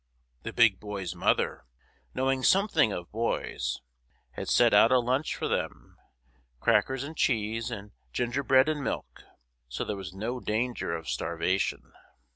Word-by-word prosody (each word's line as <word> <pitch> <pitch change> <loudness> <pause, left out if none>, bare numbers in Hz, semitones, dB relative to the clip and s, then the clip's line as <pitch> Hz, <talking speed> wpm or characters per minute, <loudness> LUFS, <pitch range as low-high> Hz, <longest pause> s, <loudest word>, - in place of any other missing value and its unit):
The - - -5
Big 110 -5 +4
Boy's 100 -4 -5
mother, 85 - 0 0.5
knowing 130 0 +1
something 185 - +4
of 90 -2 -6
boys, 105 - -2 0.5
had 65 - -6
set - - +5
out - - +6
a 130 - +6
lunch 130 +5 0
for - - -2
them, - - -3 0.6
crackers 130 - +2
and 155 +3 -7
cheese, 115 -3 0
and 105 -3 -7 0.2
gingerbread 130 +2 +2
and 155 -2 -1
milk, - - -4 0.5
so 60 - -3
there 105 - -3
was 95 -3 -7
no 110 +7 -4
danger 120 -2 -2
of 80 -2 -7
starvation. 85 +3 -1
115 Hz, 140 wpm, -28 LUFS, 95-130 Hz, 0.6 s, out